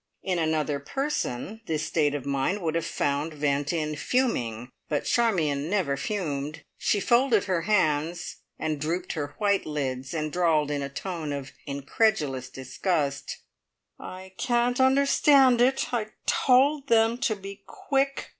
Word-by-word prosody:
In 185 Hz, -2 st, 0 dB
another 155 Hz, -3 st, 0 dB
person 220 Hz, -, -3 dB
this 155 Hz, -1 st, -1 dB
state 145 Hz, -3 st, +1 dB
of 140 Hz, -2 st, -5 dB
mind 140 Hz, +8 st, -1 dB
would 160 Hz, -2 st, 0 dB
have 165 Hz, 0 st, -1 dB
found 145 Hz, +3 st, -1 dB
vent 145 Hz, 0 st, 0 dB
in 155 Hz, -3 st, -2 dB
"fuming," 125 Hz, -, -1 dB, 0.2 s
but 145 Hz, -2 st, -1 dB
Charmion 160 Hz, -11 st, +1 dB
never 180 Hz, -9 st, +1 dB
fumed. 150 Hz, -3 st, -3 dB, 0.2 s
She 205 Hz, -, +1 dB
folded 235 Hz, -1 st, +3 dB
her 185 Hz, -4 st, 0 dB
hands, 165 Hz, -3 st, +1 dB, 0.2 s
and 155 Hz, -2 st, -2 dB
drooped 175 Hz, +4 st, -2 dB
her 145 Hz, -3 st, -4 dB
white 200 Hz, -4 st, +1 dB
lids, 135 Hz, -1 st, -3 dB
and 155 Hz, -1 st, -2 dB
drawled 160 Hz, -4 st, +2 dB
in 145 Hz, -1 st, -1 dB
a 140 Hz, -, -3 dB
tone 160 Hz, +1 st, -5 dB
of 140 Hz, -2 st, -5 dB, 0.2 s
incredulous 140 Hz, -, 0 dB
disgust: 140 Hz, +2 st, -2 dB, 0.6 s
"I 185 Hz, 0 st, -9 dB
can't 245 Hz, 0 st, +1 dB
understand 265 Hz, -1 st, +5 dB
it. 255 Hz, 0 st, +2 dB
I 225 Hz, -3 st, 0 dB, 0.2 s
told 275 Hz, +3 st, +3 dB
them 230 Hz, 0 st, +3 dB
to 220 Hz, -, +1 dB
be 200 Hz, 0 st, -9 dB
quick. 275 Hz, 0 st, -1 dB
165 Hz, 145 wpm, -26 LUFS, 145-225 Hz, 0.6 s, understand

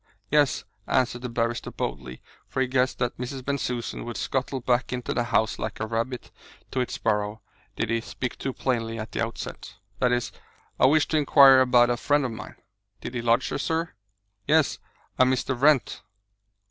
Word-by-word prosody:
"Yes," 145 Hz, -2 st, +3 dB, 0.2 s
answered 125 Hz, -1 st, +1 dB
the 125 Hz, -, -4 dB
barrister 115 Hz, 0 st, -1 dB
boldly, 65 Hz, -2 st, -5 dB, 0.2 s
for -, -, -4 dB
he 130 Hz, -, +3 dB
guessed 130 Hz, 0 st, +1 dB
that 120 Hz, -1 st, -2 dB
Mrs. 130 Hz, +1 st, -5 dB
Bensusan 125 Hz, -4 st, -2 dB
would 120 Hz, -1 st, -6 dB
scuttle 130 Hz, 0 st, -2 dB
back 125 Hz, 0 st, 0 dB
into 125 Hz, -1 st, -3 dB
the 120 Hz, -, 0 dB
house 110 Hz, -2 st, +1 dB
like 110 Hz, -1 st, -4 dB
a 110 Hz, -, -1 dB
rabbit 115 Hz, +3 st, -3 dB, 0.4 s
to 130 Hz, -, -1 dB
its 125 Hz, -, -2 dB
burrow, 105 Hz, 0 st, -1 dB, 0.3 s
did 115 Hz, -, -2 dB
he 115 Hz, 0 st, +1 dB
speak 125 Hz, +2 st, -5 dB
too 135 Hz, -, -2 dB
plainly 115 Hz, -3 st, -2 dB
at 110 Hz, -2 st, -6 dB
the -, -, -2 dB
outset, -, -, -6 dB, 0.2 s
"that 125 Hz, -1 st, +3 dB
is 120 Hz, -1 st, 0 dB, 0.5 s
I -, -, +6 dB
wish 155 Hz, +2 st, +3 dB
to 155 Hz, -, +2 dB
inquire 140 Hz, -2 st, +7 dB
about 125 Hz, -1 st, +5 dB
a 120 Hz, -, 0 dB
friend 145 Hz, +2 st, +2 dB
of 125 Hz, -, -2 dB
mine." 110 Hz, -1 st, -8 dB, 0.4 s
"Did -, -, -7 dB
he 120 Hz, -, -2 dB
lodge 115 Hz, +2 st, +2 dB
here, -, -, -3 dB
sir?" 165 Hz, +1 st, -1 dB, 0.5 s
"Yes. 155 Hz, 0 st, +3 dB, 0.4 s
A -, -, +8 dB
Mr. 130 Hz, +1 st, +1 dB
Wrent." 140 Hz, +1 st, +3 dB
125 Hz, 185 wpm, -26 LUFS, 115-130 Hz, 0.5 s, A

